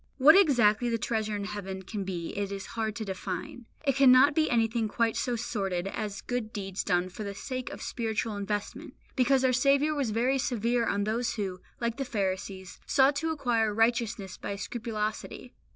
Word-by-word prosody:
What 290 +4 +8
exactly 245 - +4
the 230 - +1
treasure 220 -2 -1
in 205 - -3
heaven 195 -2 -5
can 200 +1 -4
be 175 -3 -5
it 200 -1 -2
is 195 -1 -5
hard 220 -2 -2
to 220 - -4
define. 200 +4 -5 0.2
It 275 - +2
cannot 270 +1 +7
be 310 +1 +2
anything 230 -1 +1
quite 230 +1 0
so 245 - -1
sordid 195 -6 -2
as 205 0 -4
good 245 -3 -3
deeds 195 -3 -4
done 175 0 +1
for 200 +4 -7
the 200 -1 -5
sake 255 +4 -4
of - - -8
spiritual 225 -2 -2
investment, 205 0 -4 0.2
because 260 0 +3
our 255 - +3
Saviour 280 +4 +3
was 280 -5 -1
very 245 +5 +1
severe 235 -1 0
on 200 0 0
those 225 +3 -1
who, 190 -4 -4 0.2
like 235 -1 -1
the 275 - -1
Pharisees, 190 -4 -3
sought 275 +1 +4
to 320 +3 -1
acquire 235 -8 +1
righteousness 225 -3 0
by 200 - -4
scrupulosity. 215 +3 -4
225 Hz, 185 wpm, -29 LUFS, 200-250 Hz, 0.2 s, What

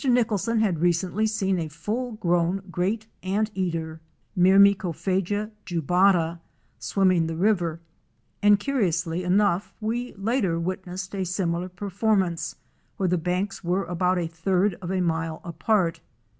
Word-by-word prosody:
Nicholson 230 -3 +2
had 190 -7 +1
recently 175 +5 +1
seen 195 -4 0
a 160 - -2
full 215 - -4
grown 175 -2 0
Great 200 +6 -1 0.2
Anteater 185 -5 -2 0.3
(Myrmecophaga 195 +1 +3
jubala) 175 0 +2 0.4
swimming 185 -4 +2
the 165 - -3
river, 175 -4 +1 0.6
and 205 0 +5
curiously 180 - 0
enough 185 0 +1
we 235 +3 -3
later 195 -4 0
witnessed 185 +2 -4
a 195 -1 -1
similar 180 -1 -2
performance 190 -1 -1 0.4
where 190 -4 +1
the 180 - +2
banks 180 +4 -2
were 180 +3 0
about 180 +1 0
a 175 - 0
third 180 +4 +1
of 180 0 -4
a 190 -1 0
mile 165 -2 -1
apart. 175 0 0
185 Hz, 125 wpm, -25 LUFS, 170-205 Hz, 0.6 s, and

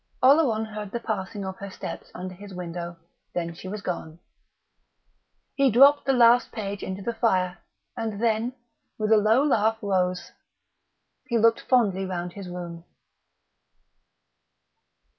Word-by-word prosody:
Oleron 260 -5 +5
heard 210 -1 -6
the 235 - -3
passing 205 -3 -4
of 190 0 -5
her 200 - -7
steps - - -7
under 185 +1 -6
his 195 +1 -11
window; 175 -1 -6 0.4
then 170 -1 -2
she 175 - -10
was 200 +2 -6
gone. 165 -3 -4 1.4
He 275 -1 +3
dropped 275 +6 +6
the - - +5
last 240 -1 +5
page 200 -3 -5
into 190 +1 -5
the 235 - -2
fire, 185 -6 +1 0.4
and 220 -3 -3
then, 230 +2 +1 0.4
with 215 0 -1
a 220 - +7
low 220 +6 +4
laugh 225 -6 +2
rose. 185 -3 -1 1.0
He 235 - +1
looked 225 0 +4
fondly 205 -7 +2
round 180 -2 -4
his 195 -2 -8
room. 170 -2 -7
205 Hz, 140 wpm, -26 LUFS, 185-230 Hz, 1.4 s, a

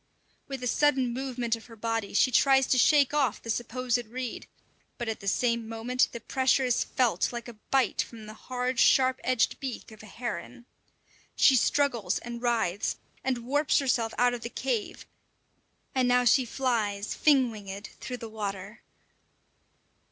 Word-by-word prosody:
With 270 -2 -6
a - - -1
sudden 265 -2 +2
movement 245 -3 -2
of 225 - -13
her 230 - -13
body 225 -2 -3
she 255 - +4
tries 270 +1 +4
to 255 - +2
shake 290 0 +4
off 270 -7 +1
the 230 - -4
supposed 245 +1 -1
reed, 250 +1 -6 0.5
but 240 - -4
at 220 - -3
the 200 - -9
same 235 +1 0
moment 235 +3 0
the 235 - -6
pressure 260 +3 +1
is 250 -1 +1
felt 235 -8 0
like 240 0 -6
a 240 - -8 0.2
bite 270 -2 +2
from 225 -2 -9
the 215 - -9
hard, 250 +2 -3
sharp 260 -1 +4
edged 255 -4 +1
beak 260 -4 -6
of 215 - -13
a 215 - -12
heron. 240 +1 -6 0.7
She 270 - +6
struggles 240 -7 +1
and 235 0 -7
writhes, 220 -6 0 0.3
and 250 -3 -2
warps 290 +3 +2
herself 240 -5 0
out 245 0 +3
of 240 - -5
the 235 - -5
cave; 240 -4 -3 0.9
and 255 -2 +2
now 250 0 +3
she 255 +2 +4
flies, 220 -5 -1
fin 270 -5 +3
winged, 200 -1 -8
through 250 - -5
the 230 - -7
water. 205 -1 -6
240 Hz, 165 wpm, -28 LUFS, 225-255 Hz, 0.9 s, She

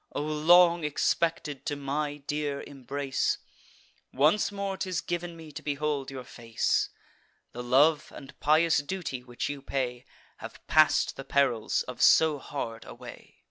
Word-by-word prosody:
O - - -2
long 170 +3 +5
expected 150 -1 -1
to 145 - -1
my 145 +1 -3
dear 145 0 -3
embrace! 140 0 -2 0.7
Once 155 +12 +3
more 200 -1 -3
'tis 185 -3 -2
giv'n 175 +2 -4
me 160 -2 -11
to - - -8
behold 145 -1 -2
your 135 -2 -7
face! 115 -2 -1 0.6
The 120 - -7
love 145 +5 +3
and 140 0 -11
pious 160 +2 +4
duty 145 -5 -5
which 120 -1 -4
you 145 -1 -5
pay 125 -3 -3 0.3
Have - - -9
pass'd 155 -1 +3
the 135 - -6
perils 135 -5 +1
of - - -8
so 155 -3 +5
hard 115 -5 -5
a - - -10
way. - - -12
145 Hz, 145 wpm, -28 LUFS, 135-160 Hz, 0.7 s, long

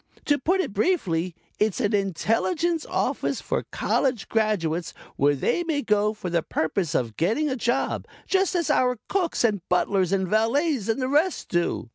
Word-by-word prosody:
To 290 -1 +2
put 370 +8 +2
it 220 - -4
briefly, 185 - 0 0.2
it's 215 0 +1
an 210 -5 0
Intelligence 230 - 0
Office - - -1
for - - -3
College 250 -7 0
graduates 180 -7 0 0.2
where 145 +1 +3
they 245 - 0
may 315 -4 -1
go 210 -1 +2
for 200 -5 -6
the 170 -1 +2
purpose 160 +1 -1
of 115 -4 -1
getting 265 - +1
a - - 0
job, 245 +2 -1 0.2
just 385 -1 +1
as 340 -3 +1
our 250 -1 +2
cooks, 365 -9 0
and 210 -5 +2
butlers 185 0 +2
and 190 -1 +1
valets 230 - +1
and 225 - +1
the 255 - 0
rest 305 +7 +1
do. 175 -7 -1
220 Hz, 170 wpm, -25 LUFS, 185-290 Hz, 0.2 s, where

